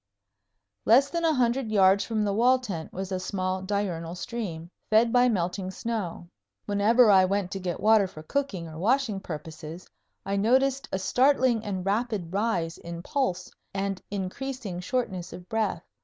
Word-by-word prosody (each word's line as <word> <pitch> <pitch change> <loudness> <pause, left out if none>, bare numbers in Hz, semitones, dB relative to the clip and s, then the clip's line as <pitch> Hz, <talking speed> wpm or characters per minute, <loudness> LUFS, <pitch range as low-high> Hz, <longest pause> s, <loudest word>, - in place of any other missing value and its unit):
Less 265 +5 +5
than 340 -1 -1
a 320 -2 +3
hundred 245 -1 +1
yards 195 -1 +5
from 220 -2 -1
the 200 - 0
wall 245 +5 +4
tent 195 -11 -6
was 190 +1 -5
a 185 - -1
small 185 0 -2
diurnal 185 -4 -2
stream, 180 -5 -5 0.2
fed 225 +2 +4
by 250 0 +5
melting 185 -2 -1
snow. 190 -5 -4 0.4
Whenever 215 +3 +4
I 190 -1 +7
went 190 0 0
to 195 - -3
get 180 -2 -3
water 215 -2 +5
for 155 -4 -11
cooking 200 - -2
or 160 0 -9
washing 230 0 +1
purposes 160 0 -8 0.4
I 200 0 -1
noticed 260 +6 +2
a - - 0
startling 250 +2 +3
and 190 -3 -4
rapid 205 -4 -1
rise 190 -6 -1
in 170 0 -7
pulse 255 -10 -1 0.2
and 195 -1 -2
increasing 205 +1 -4
shortness 185 -3 -3
of 180 0 -10
breath. 215 -6 -1
200 Hz, 160 wpm, -27 LUFS, 180-235 Hz, 0.4 s, I